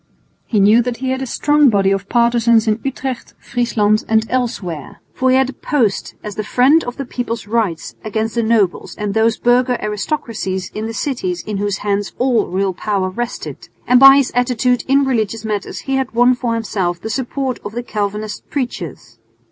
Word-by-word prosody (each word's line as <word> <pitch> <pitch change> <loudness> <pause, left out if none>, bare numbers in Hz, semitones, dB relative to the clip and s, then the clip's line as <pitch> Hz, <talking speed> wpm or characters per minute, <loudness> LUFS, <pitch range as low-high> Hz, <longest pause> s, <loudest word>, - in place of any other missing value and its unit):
He 215 - +1
knew 210 +4 +6
that 240 0 -3
he 260 0 -2
had 260 0 -2
a 265 - -3
strong 295 +3 +3
body 195 -3 +2
of 195 0 -2
partisans 235 -1 +3
in 215 +1 +1
Utrecht, 265 -2 -4
Friesland 215 -4 0
and 220 0 +3
elsewhere, 195 - -3
for 260 - +1
he 255 - +4
had 265 0 0
posed 235 -10 0
as 210 - -5
the 215 - -4
friend 265 +9 +4
of 245 - -6
the 275 - -4
people's 240 -3 -4
rights 210 -6 -1
against 220 +1 -2
the 235 - +1
nobles 220 -5 +1
and 210 -1 -3
those 220 +1 +2
burgher 245 +1 +2
aristocracies 210 -4 -3
in 215 +1 -4
the 225 - -5
cities 185 - -2
in 210 -2 -4
whose 205 0 -1
hands 205 0 -1
all 245 -4 +2
real 190 +1 -1
power 190 -1 -1
rested, 240 +5 -6 0.2
and 250 0 +5
by 270 +1 +10
his 275 -3 +1
attitude 245 0 +1
in 275 +1 +3
religious 225 -3 -1
matters 210 -2 -3
he 270 -1 -1
had 265 -3 -3
won 245 +1 +5
for 245 -2 -2
himself 190 -6 -2
the 220 - -6
support 260 +1 -2
of 205 - -6
the 240 +1 -4
Calvinist 210 -1 -4
preachers. 175 - -5
230 Hz, 190 wpm, -18 LUFS, 205-250 Hz, 0.2 s, by